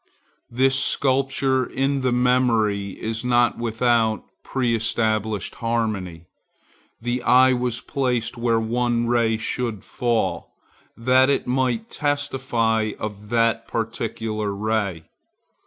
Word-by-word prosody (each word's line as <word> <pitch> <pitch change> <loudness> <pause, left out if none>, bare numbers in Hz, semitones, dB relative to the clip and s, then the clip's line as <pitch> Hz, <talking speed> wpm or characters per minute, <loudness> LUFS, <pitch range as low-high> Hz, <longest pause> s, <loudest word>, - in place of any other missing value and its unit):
This 130 +2 +2
sculpture 135 -1 +1
in 135 +2 -1
the 130 -1 +1
memory 115 -5 +1
is 110 +1 -3
not 120 -1 +2
without 115 -1 +1 0.2
preestablished 110 -4 0
harmony. 105 -8 -2 0.7
The 120 +2 -2
eye 130 +1 +5
was 125 -1 -2
placed 125 -5 -1
where 115 -1 +1
one 120 +1 0
ray 115 -2 +2
should 115 -2 -3
fall, 120 -2 -2 0.4
that 130 +3 +4
it 140 - +1
might 125 -3 -1
testify 130 -7 0
of 105 -1 -7
that 115 0 +1
particular 110 -2 -3
ray. 100 -5 -1
115 Hz, 105 wpm, -23 LUFS, 110-125 Hz, 0.7 s, eye